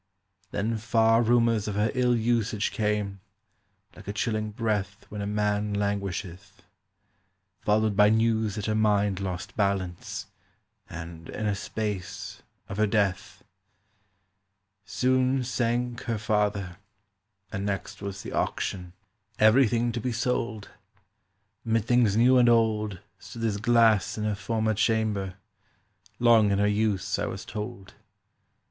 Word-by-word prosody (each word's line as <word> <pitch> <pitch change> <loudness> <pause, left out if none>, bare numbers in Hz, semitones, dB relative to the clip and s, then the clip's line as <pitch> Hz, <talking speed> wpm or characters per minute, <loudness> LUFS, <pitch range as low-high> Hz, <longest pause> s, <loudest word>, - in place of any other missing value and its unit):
"Then 110 +3 -1
far 115 +1 +3
rumours 115 -2 +2
of 105 - -3
her 105 +1 +1
ill 125 -1 +2
usage 115 -2 0
Came, 105 -2 -1 0.8
like - - -14
a 100 - -3
chilling 110 0 -1
breath 105 -2 -2
When 105 0 -6
a 100 - -3
man 105 0 0
languisheth; 100 -1 -4 1.0
Followed 110 0 +1
by 105 0 +6
news 110 -1 +2
that 105 -2 -4
her 110 - 0
mind 105 -2 +2
lost 95 0 -5
balance, 100 -4 -2 0.6
And, 85 -1 -8
in 110 - -4
a 105 - +1
space, 100 -2 -5 0.3
of 100 - -6
her 110 0 +3
death. 100 -2 -1 1.4
"Soon 130 +7 +1
sank 120 0 -1
her 115 -2 -1
father; 105 -4 -1 0.7
and 100 -2 -3
next 100 -1 -4
was 100 -1 -6
the - - -7
auction— 90 -2 -2 0.4
Everything 120 +1 +4
to 120 0 -4
be 125 - -2
sold: 115 -2 -2 0.9
Mid 115 -2 0
things 120 -4 +3
new 125 +2 +5
and 120 -1 +5
old 110 -4 +1 0.2
Stood 115 -2 -9
this 110 -3 0
glass 110 -2 +3
in 105 - -3
her 105 0 0
former 110 +2 -1
chamber, 105 -3 0 0.8
Long 115 -3 +5
in 100 - +2
her 100 - +2
use, 105 -1 0
I - - -1
was - - -6
told. 100 -2 -7
105 Hz, 130 wpm, -27 LUFS, 100-115 Hz, 1.4 s, by